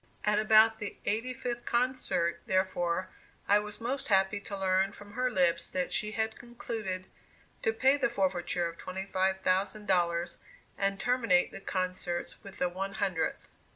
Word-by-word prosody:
At 210 Hz, 0 st, +3 dB
about 220 Hz, +1 st, +6 dB
the 210 Hz, -, -5 dB
eighty 225 Hz, +5 st, 0 dB
fifth 240 Hz, -1 st, -4 dB
concert, 240 Hz, -8 st, 0 dB
therefore, 185 Hz, -1 st, 0 dB, 0.4 s
I 205 Hz, +1 st, +6 dB
was 210 Hz, 0 st, -7 dB
most 255 Hz, +4 st, -3 dB
happy 195 Hz, 0 st, +3 dB
to 200 Hz, 0 st, -6 dB
learn 190 Hz, +1 st, +2 dB
from 205 Hz, 0 st, -12 dB
her 250 Hz, +2 st, +1 dB
lips 180 Hz, -7 st, +2 dB
that 185 Hz, -1 st, -1 dB
she 215 Hz, 0 st, -1 dB
had 220 Hz, 0 st, -2 dB
concluded 225 Hz, -6 st, -5 dB, 0.6 s
to 225 Hz, -, +2 dB
pay 265 Hz, +5 st, +3 dB
the 280 Hz, -, +1 dB
forfeiture 180 Hz, -5 st, 0 dB
of 170 Hz, 0 st, -8 dB
twenty 190 Hz, +1 st, -5 dB
five 190 Hz, 0 st, 0 dB
thousand 195 Hz, +3 st, +1 dB
dollars, 175 Hz, -3 st, +1 dB, 0.4 s
and 195 Hz, 0 st, 0 dB
terminate 230 Hz, -6 st, +2 dB
the -, -, -8 dB
concerts 185 Hz, -2 st, -3 dB
with 195 Hz, -1 st, -11 dB
the 180 Hz, -, +1 dB
one 195 Hz, +2 st, -4 dB
hundredth. 190 Hz, -6 st, -1 dB
195 Hz, 160 wpm, -30 LUFS, 185-220 Hz, 0.6 s, about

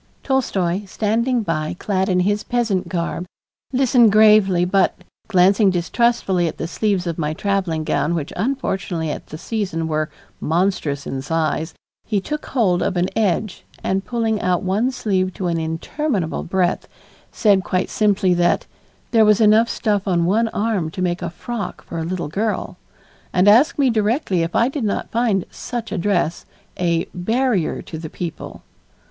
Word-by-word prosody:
Tolstoy, 200 Hz, -8 st, 0 dB
standing 225 Hz, +5 st, 0 dB
by 165 Hz, -2 st, -2 dB
clad 190 Hz, 0 st, -1 dB
in 180 Hz, -1 st, +2 dB
his 205 Hz, +3 st, 0 dB
peasant 205 Hz, -7 st, -1 dB
garb, 170 Hz, +1 st, -3 dB, 0.4 s
listened 250 Hz, -4 st, +4 dB
gravely 210 Hz, -4 st, +5 dB
but, 190 Hz, +1 st, +2 dB, 0.3 s
glancing 195 Hz, +1 st, +4 dB
distrustfully 185 Hz, 0 st, +1 dB
at -, -, -5 dB
the 165 Hz, -, -3 dB
sleeves 195 Hz, 0 st, 0 dB
of 170 Hz, -1 st, -3 dB
my 155 Hz, 0 st, -1 dB
traveling 185 Hz, -5 st, -1 dB
gown 150 Hz, +2 st, 0 dB
which 155 Hz, -3 st, -4 dB
unfortunately 190 Hz, -, -2 dB
at -, -, -7 dB
that 155 Hz, -, -8 dB
season 185 Hz, -5 st, -3 dB
were 155 Hz, -1 st, -1 dB, 0.3 s
monstrous 160 Hz, -4 st, 0 dB
in 135 Hz, 0 st, -4 dB
size, 160 Hz, +2 st, -1 dB, 0.3 s
he 210 Hz, -3 st, 0 dB
took 300 Hz, +9 st, -5 dB
hold 190 Hz, -9 st, +1 dB
of 185 Hz, -, -1 dB
an 175 Hz, +1 st, +1 dB
edge 210 Hz, -2 st, 0 dB, 0.2 s
and 190 Hz, 0 st, 0 dB
pulling 225 Hz, -3 st, -1 dB
out 180 Hz, -1 st, +1 dB
one 200 Hz, +7 st, +1 dB
sleeve 190 Hz, -7 st, -1 dB
to 190 Hz, -, -4 dB
an 170 Hz, -1 st, 0 dB
interminable 165 Hz, -, -2 dB
breadth, 180 Hz, 0 st, 0 dB, 0.4 s
said 200 Hz, -4 st, +3 dB
quite 185 Hz, +1 st, -1 dB
simply 200 Hz, -3 st, +2 dB
that 175 Hz, 0 st, +2 dB, 0.5 s
"there 225 Hz, -2 st, +5 dB
was 210 Hz, 0 st, +4 dB
enough 220 Hz, +1 st, +5 dB
stuff 205 Hz, -3 st, -1 dB
on 170 Hz, -3 st, +2 dB
one 220 Hz, +6 st, +2 dB
arm 210 Hz, -6 st, -1 dB
to 185 Hz, +3 st, -4 dB
make 175 Hz, -1 st, -1 dB
a 175 Hz, -, -2 dB
frock 205 Hz, +3 st, -6 dB
for 165 Hz, -, -6 dB
a -, -, -2 dB
little 170 Hz, -1 st, -3 dB
girl," 210 Hz, +8 st, -2 dB, 0.6 s
and 185 Hz, +2 st, +3 dB
asked 245 Hz, +11 st, +5 dB
me 280 Hz, -2 st, +3 dB
directly 215 Hz, -, +1 dB
if 165 Hz, +1 st, -2 dB
I 235 Hz, -, +4 dB
did 275 Hz, -1 st, -3 dB
not 210 Hz, -, -2 dB
find 225 Hz, -5 st, +1 dB
"such 240 Hz, -4 st, -5 dB
a 210 Hz, -, -2 dB
dress" 175 Hz, -3 st, 0 dB, 0.3 s
a 170 Hz, -2 st, 0 dB
"barrier 220 Hz, 0 st, 0 dB
to 160 Hz, -, -7 dB
the 160 Hz, -1 st, -7 dB
people." 170 Hz, 0 st, -7 dB
190 Hz, 165 wpm, -20 LUFS, 170-220 Hz, 0.6 s, gravely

